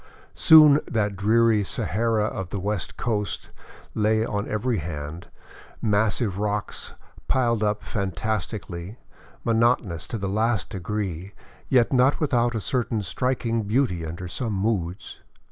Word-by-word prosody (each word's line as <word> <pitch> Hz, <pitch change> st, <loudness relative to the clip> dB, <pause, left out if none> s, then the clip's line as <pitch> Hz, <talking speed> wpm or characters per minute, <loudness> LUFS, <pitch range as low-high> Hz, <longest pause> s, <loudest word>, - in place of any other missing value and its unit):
Soon 150 Hz, -2 st, +7 dB
that 105 Hz, -3 st, 0 dB
dreary 110 Hz, +2 st, +3 dB
Sahara 110 Hz, +3 st, 0 dB
of 95 Hz, -4 st, -4 dB
the 100 Hz, -, -4 dB
West 100 Hz, 0 st, -3 dB
Coast 105 Hz, -4 st, -2 dB, 0.4 s
lay 110 Hz, +1 st, +2 dB
on 105 Hz, -1 st, -3 dB
every 110 Hz, +1 st, 0 dB
hand, 75 Hz, +1 st, -6 dB, 0.5 s
massive 105 Hz, -1 st, 0 dB
rocks 105 Hz, 0 st, -3 dB, 0.3 s
piled 115 Hz, -4 st, +1 dB
up 105 Hz, 0 st, 0 dB
fantastically, 100 Hz, 0 st, -4 dB, 0.5 s
monotonous 115 Hz, -7 st, +1 dB
to 115 Hz, -, -4 dB
the 100 Hz, -2 st, -3 dB
last 110 Hz, 0 st, 0 dB
degree, 95 Hz, -2 st, -4 dB, 0.3 s
yet 125 Hz, -1 st, +3 dB
not 130 Hz, +2 st, +4 dB
without 120 Hz, -5 st, +1 dB
a -, -, 0 dB
certain 115 Hz, -1 st, -1 dB
striking 115 Hz, +2 st, -1 dB
beauty 105 Hz, -4 st, 0 dB
tinder 85 Hz, +3 st, -6 dB
some 110 Hz, +4 st, -3 dB
moods. 95 Hz, -3 st, -2 dB
105 Hz, 125 wpm, -24 LUFS, 95-115 Hz, 0.5 s, Soon